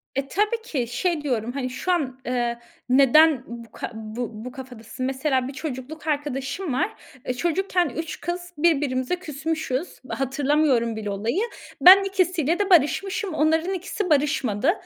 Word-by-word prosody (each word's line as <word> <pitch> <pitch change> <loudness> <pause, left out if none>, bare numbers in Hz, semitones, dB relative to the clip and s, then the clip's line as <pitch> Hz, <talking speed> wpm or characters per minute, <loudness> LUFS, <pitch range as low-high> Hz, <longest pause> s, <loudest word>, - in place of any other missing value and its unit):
E, 275 0 -1
tabii 425 - 0
ki, 265 - -2
şey 320 +6 -1
diyorum 245 -5 -1
hani 255 -1 -3
şu 365 +8 -2
an, 265 -7 -1
eee, 240 -1 -1 0.3
neden 275 +2 +5
bu 235 -1 -9
ka - - -6
bu 220 +2 -5 0.2
bu 250 - -6
kafadasın? 255 -2 -7
Mesela, 265 -1 0
bir 270 - -6
çocukluk 290 +2 -6
arkadaşım 290 +2 -2
var. 260 - +1 0.4
E, 250 - -1
çocukken 350 +4 0
üç 320 +5 -5
kız 350 0 -5
birbirimize 290 -3 +1
küsmüşüz. 315 -2 -4
Hatırlamıyorum 270 -3 +1
bile 210 -2 -4
olayı. 220 - -1 0.4
Ben 380 +2 +10
ikisiyle 365 -4 +1
de 405 -1 0
barışmışım. 375 +4 +2
Onların 320 +4 +2
ikisi 370 +1 -3
barışmadı. 275 -3 +2
285 Hz, 145 wpm, -24 LUFS, 255-345 Hz, 0.4 s, Ben